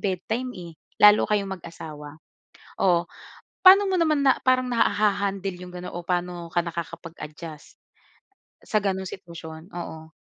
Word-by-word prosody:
bedtime, 215 +6 -2
eh, 170 -2 -9 0.2
lalo 210 0 +7
kayong 195 -3 -1
mag-asawa. 155 -3 -9 0.7
O, 175 -2 +3 0.6
pa'no 390 +2 +9
mo 380 - +1
naman 305 -5 +2
na 265 - +3
parang 255 0 +3
naha-handle 200 -4 +1
yung 180 0 -10
ga'non 180 0 -7
o 175 - -5
paano 175 -1 -3
ka 175 - +2
nakakapag-adjust 165 -2 -7 0.9
sa 215 -2 +1
ganung 190 -1 -1
sitwasyon? 170 -3 -9
Oo. 160 -3 -8
180 Hz, 130 wpm, -25 LUFS, 170-210 Hz, 0.9 s, pa'no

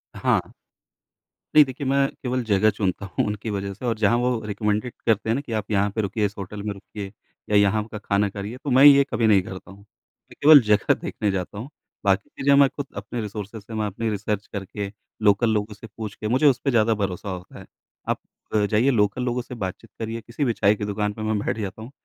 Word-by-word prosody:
हाँ। - - 0 1.0
नहीं 150 - +10
देखिए 135 +1 -6
मैं 140 0 +3 0.2
केवल 125 0 -1
जगह 105 -1 +3
चुनता 100 -2 -2
हूँ 95 - -1
उनकी 105 +1 -4
वज़ह 100 -1 -3
से 105 +6 -9
और 115 -2 0
जहाँ 110 +2 +3
वो 125 -1 +1
रेकमेंडेड 105 +2 -1
करते 110 -1 +1
हैं 115 - +3
ना 140 - -1
कि 135 - -10
आप 110 -2 -1
यहाँ 100 0 +2
पे 110 - +1
रुकिए, 105 +1 -1
इस 100 +1 -3
होटल 100 +1 -6
में 105 - -2
रुकिए 100 0 -8 0.4
या 105 - +2
यहाँ 100 +1 +4
का 110 - -5
खाना 100 0 0
करिए 100 +4 -6
तो 145 - -3
मैं 130 +2 +6
ये 140 -1 +9
कभी 110 0 +2
नहीं 100 -3 +5
करता 95 +1 -9
हूँ। 95 - -13
मैं 100 +1 -23
केवल 145 -2 +9
जगह 105 -1 +4
देखने 105 -2 -2
जाता 95 +1 -4
हूँ 120 +7 -6 0.4
बाकी 100 0 +2
चीज़ें 140 +1 +1
मैं 140 0 +7
ख़ुद 145 - -6
अपने 120 - -4
रिसोर्सेज़ 105 0 -6
से, 110 - -11
मैं 110 -1 -1
अपनी 110 +3 -3
रिसर्च 105 0 -3
करके, 100 0 -5 0.3
लोकल 105 +2 +4
लोगों 105 0 -1
से 110 +2 -11
पूछ 110 -2 -5
के, 110 - -5
मुझे 130 +7 +2
उस 135 -3 +4
पे 135 - +3
ज़्यादा 115 -1 +3
भरोसा 100 -2 -3
होता 90 -1 -8
है। - - -11 0.4
आप - - 0 0.5
जाइए 110 +5 +3
लोकल 105 0 +1
लोगों 125 0 -1
से 125 +1 -9
बातचीत 100 +1 -6
करिए 115 +1 -4
किसी 120 +6 -4
भी 120 - +1
चाय 105 -1 +3
की 105 - -4
दुकान 105 0 -2
पे 110 - -8
मैं 110 0 0
बैठ 105 - -2
जाता 100 0 -5
हूँ। 115 +4 -9
105 Hz, 230 wpm, -24 LUFS, 100-120 Hz, 1.0 s, नहीं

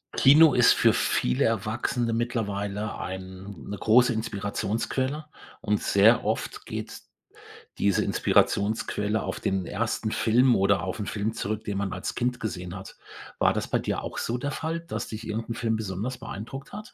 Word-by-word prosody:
Kino 150 +2 +7
ist - - +6
für - - +4
viele 65 0 +1
Erwachsene 115 +3 -1
mittlerweile 105 -3 -2
eine 95 -1 -7
große 120 +2 +5
Inspirationsquelle. 110 +7 -2 0.3
Und 105 0 0
sehr 110 +4 +5
oft - - -3
geht - - -6 0.8
diese 100 -2 +2
Inspirationsquelle 105 0 +1
auf - - -4
den 95 -2 -1
1. 110 +2 -2
Film 120 +3 +4
oder 100 -2 +2
auf 95 +3 -4
'n 105 - -3
Film 110 +1 -2
zurück, 110 0 -3
den 100 -1 -3
man 100 -2 -2
als 90 - -4
Kind 125 0 -1
gesehen 90 -4 -5
hat. 95 0 -10 0.4
War - - +4
das - - -2
bei - - +1
dir - - -2
auch - - -5
so 120 - -1
der 145 +3 -3
Fall, 160 +2 -3
dass 170 - -5
dich 110 +1 -7
irgend 110 +1 -4
'n 115 - -2
Film 115 -2 0
besonders 110 +4 -4
beeindruckt 130 +7 -7
hat? 210 +2 -9
110 Hz, 165 wpm, -26 LUFS, 100-120 Hz, 0.8 s, Kino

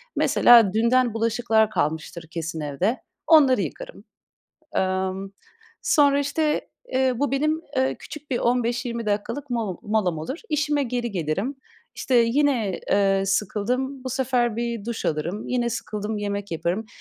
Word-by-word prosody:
Mesela, 230 -5 +6
dünden 235 +1 +3
bulaşıklar 225 -1 +2
kalmıştır 160 -2 -2
kesin 165 -1 -4
evde, 175 - -1 0.3
onları 285 -6 +6
yıkarım. - - -7 0.7
Emm, 190 +1 -1 0.5
sonra 285 -1 +4
işte, 300 +2 -1 0.2
eee, 260 0 +2
bu 285 +3 0
benim, 305 +3 +1 0.2
eee, 260 0 +1
küçük 300 -1 -10
bir 245 - +1
15-20 240 -1 -1
dakikalık 215 +7 -2
molo 220 -7 -2
molam 205 -6 0
olur, 260 - -5
işime 295 -1 +1
geri 240 -2 -2
gelirim. 195 - -2 0.4
İşte, 260 - -2
yine, 235 -4 +2
eee, 195 -1 +3
sıkıldım, 250 +7 -1
bu 260 - -3
sefer 245 -3 0
bir 235 -3 -3
duş 235 -1 -4
alırım, 165 +7 -2
yine 240 -1 0
sıkıldım, 210 -2 -4
yemek 205 0 -3
yaparım. 175 +7 -2
235 Hz, 135 wpm, -24 LUFS, 200-260 Hz, 0.7 s, Mesela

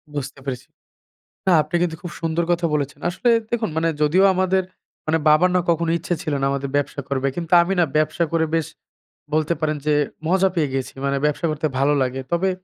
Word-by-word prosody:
বুঝতে 140 0 -5
পেরেছি। 130 -3 -5 0.8
না, - - +5
আপনি 175 - -13
কিন্তু 165 -2 -1
খুব 175 - -6
সুন্দর 165 +1 0
কথা 170 0 +1
বলেছেন। 145 0 -2
আসলে 235 +7 +1 0.2
দেখুন 230 -6 -1
মানে 165 +1 +1
যদিও 180 +6 +4
আমাদের 185 0 +2 0.4
মানে 160 +1 +2
বাবার 175 +4 +5
না - - +4
কখনো 165 0 +1
ইচ্ছে 175 +1 -2
ছিল 155 - -3
না 135 - +1
আমাদের 140 0 -3
ব্যবসা 145 0 -1
করবে। 135 0 0
কিন্তু 170 0 -5
আমি 185 +3 -1
না - - +5
ব্যবসা 155 +2 +1
করে 165 -1 +2
বেশ 165 -2 +1 0.7
বলতে 155 +2 +2
পারেন 155 -1 0
যে 150 - +2 0.3
মজা 190 +2 +3
পেয়ে 155 -4 +1
গিয়েছি। 135 -1 -3
মানে 140 0 0
ব্যবসা 150 +3 0
করতে 155 +1 -1
ভালো 145 +2 +3
লাগে। 130 +1 -1
তবে 185 +3 +2
160 Hz, 200 wpm, -22 LUFS, 145-175 Hz, 0.8 s, না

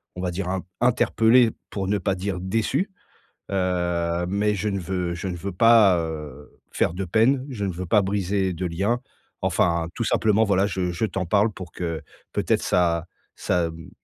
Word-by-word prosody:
on 90 - -5
va 90 -1 -1
dire 90 +1 -3
in 95 -2 -2 0.2
interpellé 120 -1 +4 0.2
pour 95 -2 -3
ne 105 +1 +1
pas 95 +2 0
dire 95 0 -3
déçu. 115 - 0 0.6
Heu, 90 -2 0
mais 105 +2 +1
je 105 +3 -1
ne 100 -1 -2
veux 90 -1 -2
je 90 +3 -4
ne 90 - -4
veux 95 +2 -5
pas, 105 -3 +6
heu, 75 -3 -6 0.2
faire - - +1
de 95 +1 -3
peine. 125 +8 +2
Je 105 -5 -3
ne 95 - -1
veux 90 +1 -5
pas 105 +3 +4
briser 95 -1 0
de 90 +2 -3
lien. 100 +8 0 0.4
Enfin, 85 -1 +1
tout - - -3
simplement 110 0 +2
voilà 100 -1 +2
je 95 -3 -2
je 90 +6 -1
t'en 95 -2 -3
parle 105 +4 +2
pour 90 -3 -9
que, 85 -2 -4 0.3
peut-être, - - +1
ça 85 -2 +2 0.3
ça, 85 -2 0
mmh, 80 0 -11
95 Hz, 190 wpm, -24 LUFS, 85-105 Hz, 0.6 s, pas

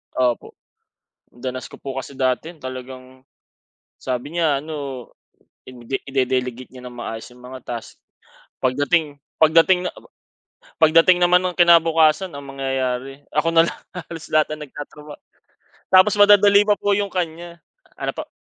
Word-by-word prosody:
Opo. 125 -2 -1 0.7
Danas 130 +1 -7
ko - - -13
po 135 -1 -6
kasi 135 +1 -8
dati 130 +4 0
'yan 160 - -23
talagang, 130 0 -9 0.8
sabi 130 +5 -5
niya 160 -5 +2
ano 140 -5 -7 0.6
ide 125 +1 -6
ide-delegate 130 -2 -2
niya 130 -1 -12
ng 120 - -13
maayos 115 -2 -6
yung 125 0 -18
mga 130 +1 -9
tasks, 120 -2 -8 0.6
pagdating 145 +3 0 0.2
pagdating 165 +3 +4
na - - -5
aba! - - -16 0.7
Pagdating 165 +3 +6
naman 180 0 +5
ng 180 -1 -3
kinabukasan 165 0 +4
ang 140 0 -8
mangyayari 135 -1 -3 0.2
ako 150 +2 +2
na 165 0 +6
lang - - -7
halos 170 -3 -8
lahat 155 0 +2
ang 155 - -14
nagtatrabaho 150 +1 -11 0.7
tapos 185 +2 +6
madadali 205 0 +7
pa 205 - +4
po 205 - -1
yung 200 0 -1
kanya. 170 -1 -5 0.4
Ano - - -3
po? - - -7
145 Hz, 145 wpm, -21 LUFS, 130-170 Hz, 0.8 s, madadali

